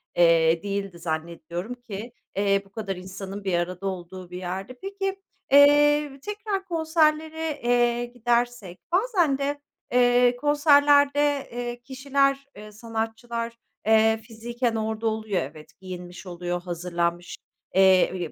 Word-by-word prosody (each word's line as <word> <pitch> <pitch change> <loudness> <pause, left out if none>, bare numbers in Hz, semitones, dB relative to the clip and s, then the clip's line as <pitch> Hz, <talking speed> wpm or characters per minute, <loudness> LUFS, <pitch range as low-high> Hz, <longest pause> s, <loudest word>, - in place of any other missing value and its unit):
eee, 165 -1 +4
değildi 195 -3 -4
zannediyorum 170 +5 -4
ki, 235 -1 -8 0.2
eee, 200 0 +2
bu 195 - -22
kadar 195 -3 -4
insanın 190 +2 -8
bir 190 -2 -1
arada 180 +2 -3
olduğu 185 -1 -6
bir 180 - -6
yerde. 190 +6 -5
Peki, 390 0 -4 0.3
eee, 290 0 +5
tekrar 415 0 -4
konserlere, 320 -2 0
eee, 240 0 +2
gidersek, 240 -5 -1
bazen 360 - +2
de, 285 +1 -2 0.3
eee, 245 0 +4
konserlerde, 290 0 +4
eee, 240 0 -5
kişiler, 275 +1 0
eee, 210 +1 -11
sanatçılar, 230 +1 -4 0.3
eee, 220 0 +4
fiziken 235 +1 -3
orada 220 0 -2
oluyor; 220 -4 -1
evet, 150 +3 -9
giyinmiş 180 0 -8
oluyor, 175 0 -4
hazırlanmış, 175 0 -3 0.4
eee, 185 -3 +4
225 Hz, 120 wpm, -25 LUFS, 185-280 Hz, 0.4 s, eee